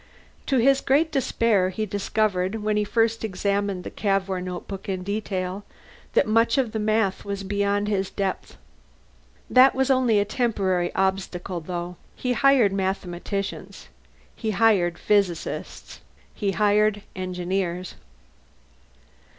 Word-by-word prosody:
To 270 - +2
his 270 +3 +4
great 305 +4 +2
despair 230 -8 +2
he 215 +3 -3
discovered, 205 0 -1
when 215 0 +1
he 210 - +2
first 225 +1 +1
examined 200 -1 -1
the - - -7
Cavour 195 -2 -1
notebook 185 +2 -6
in 185 -1 -2
detail, 195 -1 -3 0.5
that - - +4
much 230 +3 +3
of 255 -5 +1
the 220 - -3
math 215 -2 +1
was 200 -1 -4
beyond 200 +1 0
his 195 -2 0
depth. 195 -2 -4 0.9
That 255 +2 +6
was 265 +1 +2
only 255 -4 +3
a 205 - +2
temporary 195 -7 0
obstacle, 190 -1 -1
though. 175 +1 -5 0.2
He 250 -1 -1
hired 245 -4 +4
mathematicians. 190 0 -4 0.5
He 220 - -3
hired 200 -5 +3
physicists. 200 -5 -1 0.3
He 200 -2 -1
hired 210 0 +2
engineers. 185 0 -3
200 Hz, 125 wpm, -24 LUFS, 185-220 Hz, 0.9 s, That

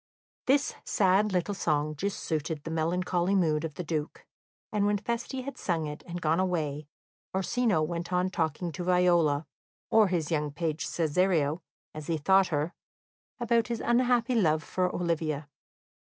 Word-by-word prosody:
This 275 +2 +3
sad 200 +2 +3
little 185 +2 0
song 155 -4 0
just 200 +6 -3
suited 155 -1 -2
the 165 - -5
melancholy 175 +3 0
mood 155 -5 +2
of 155 -3 -4
the 180 - -4
Duke, 155 -2 -4 0.5
and 205 -1 +1
when 205 0 +2
Feste 235 +4 -3
had 280 +1 -7
sung 165 -4 -1
it, 150 0 -6
and 175 0 -5
gone 160 0 +1
away, 155 -6 -1 0.5
Orsino 195 -2 +1
went 170 +2 -3
on 180 +1 +1
talking 165 0 -1
to 170 +3 -5
Viola 175 -4 +3 0.5
or 220 -2 +6
his 170 -4 -1
young 150 -2 0
page 155 +1 -2
Cesario, 165 -1 +1 0.3
as 155 -1 -7
he 165 - 0
thought 190 +5 +4
her 155 +1 -1 0.7
about 235 0 +2
his 235 -2 -2
unhappy 245 0 +2
love 160 -9 +2
for 185 -1 0
Olivia. 160 -4 -2
175 Hz, 155 wpm, -29 LUFS, 155-195 Hz, 0.7 s, or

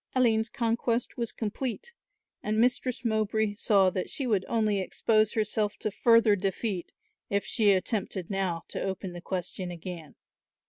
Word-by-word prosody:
Aline's 225 -3 +3
conquest 235 +1 -1
was 235 -2 -2
complete 255 - -4 0.5
and 215 +1 -1
Mistress 250 +1 +1
Mowbray 220 -1 +1
saw 200 -3 +3
that 185 0 -3
she 275 - -1
would 210 -6 +1
only 215 -3 +1
expose 215 +3 +2
herself 215 -1 0
to 215 - -2
further 230 0 +5
defeat 195 0 -2 0.4
if 200 0 0
she 215 -3 +2
attempted 190 -1 -1
now 185 -4 -1
to - - -4
open 190 -1 -3
the 175 - -8
question 180 0 -3
again. 170 -2 -8
210 Hz, 145 wpm, -28 LUFS, 190-230 Hz, 0.5 s, further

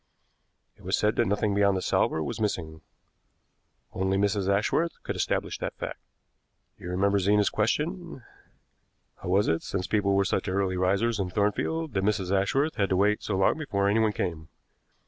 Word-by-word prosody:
It - - -21
was - - 0
said 105 0 +1
that 120 - +2
nothing 105 +1 0
beyond 100 -1 +3
the - - -2
salver 80 - +1
was 75 - -5
missing. 80 -7 -3 1.1
Only 95 0 0
Mrs. 100 -1 +1
Ashworth 125 +11 +1
could - - -4
establish - - -2
that - - -4
fact. - - -6 0.8
You 90 - -7
remember 100 +2 +2
Zena's 105 +2 +2
question: 155 - -2 0.9
'How - - -7
was 100 +3 +3
it, 80 0 +1
since 95 -1 -3
people 100 -1 +1
were 100 0 +3
such 95 - -1
early 95 0 0
risers 100 +5 +1
in 95 -2 -1
Thornfield, 120 - -1
that 95 -2 0
Mrs. 100 -2 0
Ashworth 135 +11 0
had 100 -2 +1
to 95 - +1
wait 105 +2 +2
so 100 - -2
long 95 +10 +2
before 100 -10 -1
anyone 110 +1 +3
came?' 85 -6 -4
100 Hz, 170 wpm, -27 LUFS, 95-105 Hz, 1.1 s, beyond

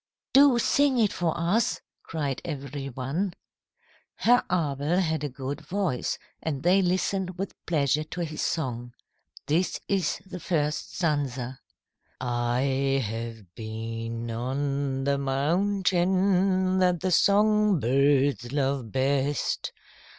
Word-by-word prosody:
"Do 275 -2 +7
sing 275 +2 +3
it 215 -4 +3
for 170 -2 -1
us," 185 +8 +1 0.2
cried 145 -5 -3
every 140 -3 -5
one. 140 +10 -2 0.8
Herr 245 +1 +4
Abel 150 -1 0
had 160 -5 0
a 145 - -1
good 135 +2 -5
voice 190 -10 -1 0.2
and 145 -4 -3
they 185 +3 +5
listened 185 0 0
with 195 +1 -4
pleasure 150 -2 +2
to 165 +3 -6
his 155 -2 -4
song. 120 -6 -2 0.5
This 170 +5 0
is 190 -5 0
the 185 -1 -7
first 155 -4 -1
stanza: 135 -6 -1 0.6
"I 130 +3 0
have 115 -4 -6
been 115 +1 -5
on 135 +3 -2
the 140 0 +1
mountain 185 +5 +2
That 180 -2 +2
the 185 0 0
song 210 0 +4
birds 135 -1 +2
love 135 -5 -1
best. 135 +1 0
145 Hz, 115 wpm, -27 LUFS, 135-185 Hz, 0.8 s, Do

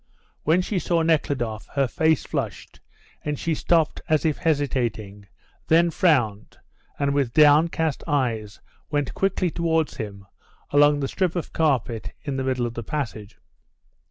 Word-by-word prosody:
When 170 +4 +3
she 190 0 -1
saw 170 -1 +1
Nekhludoff 130 -9 0
her 135 -2 +2
face 160 +3 +1
flushed, - - -5 0.4
and 150 -1 -2
she 165 - -1
stopped 160 0 +1
as 155 0 +2
if 155 -2 0
hesitating, 120 -10 -1 0.4
then 170 +1 +4
frowned, 120 - +1 0.4
and 140 0 0
with 135 -5 0
downcast 155 0 +4
eyes 115 -8 -1 0.3
went 145 -3 -1
quickly 190 -2 0
towards 160 -2 0
him 100 -2 -7 0.5
along 145 0 +4
the 135 - 0
strip 185 +1 -1
of 175 - -4
carpet 125 -8 0
in 140 - -3
the 135 - -2
middle 130 -2 0
of 120 - -4
the 120 - -5
passage. 110 -6 -5
145 Hz, 145 wpm, -24 LUFS, 120-160 Hz, 0.5 s, then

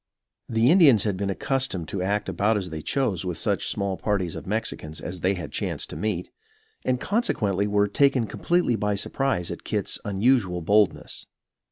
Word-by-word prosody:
The 115 +4 +4
Indians 145 - +6
had 105 -3 0
been 100 +1 -2
accustomed 100 - -1
to 95 - -3
act 100 +3 0
about 100 +4 +1
as 90 -4 -4
they 80 -1 -5
chose 105 - 0
with 90 -2 -3
such - - 0
small 100 -1 -1
parties 95 -6 -1
of - - -8
Mexicans 100 -7 -3
as 90 -1 -6
they 95 +2 +2
chanced - - -3
to - - -6
meet, 100 -5 -2 0.5
and 125 -1 0
consequently 105 - 0
were 105 0 +2
taken 135 +2 +3
completely 170 - +1
by 105 -2 0
surprise 100 -3 -1
at - - -7
Kit's - - -2
unusual 100 -4 +1
boldness. 100 -1 +1
100 Hz, 170 wpm, -25 LUFS, 95-120 Hz, 0.5 s, Indians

